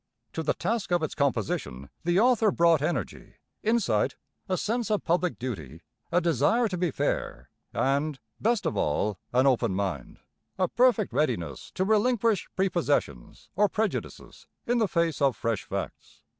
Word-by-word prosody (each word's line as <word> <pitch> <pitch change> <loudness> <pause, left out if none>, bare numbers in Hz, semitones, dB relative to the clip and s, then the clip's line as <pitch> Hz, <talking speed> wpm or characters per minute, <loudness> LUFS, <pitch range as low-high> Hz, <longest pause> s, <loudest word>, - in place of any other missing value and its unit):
To - - -2
the - - 0
task 225 -5 -2
of 175 -2 +2
its 155 - -2
composition 105 - -2
the 175 +2 +2
author 230 -2 +4
brought 170 -5 +4
energy, 145 - -3 0.3
insight, 160 - +1 0.3
a 185 - +1
sense 230 +4 -1
of 210 -1 0
public 175 +1 0
duty, 85 - -6 0.3
a 175 - +4
desire 170 - +2
to 185 - -3
be 180 -1 0
fair, 60 - -3 0.2
and, 140 +1 0 0.2
best 225 -3 +1
of 160 - 0
all, 95 +6 0
an 130 +2 +3
open 120 -7 +2
mind, 95 -9 -3 0.4
a 185 -1 +2
perfect 240 -3 +2
readiness 85 - -1
to 185 - +1
relinquish 220 0 +2
prepossessions 150 - -1
or 205 +1 +3
prejudices 215 +1 -4 0.2
in 240 0 +1
the 220 - +3
face 170 -4 0
of 135 -6 +3
fresh 115 -3 -2
facts. - - -6
170 Hz, 155 wpm, -27 LUFS, -, 0.4 s, author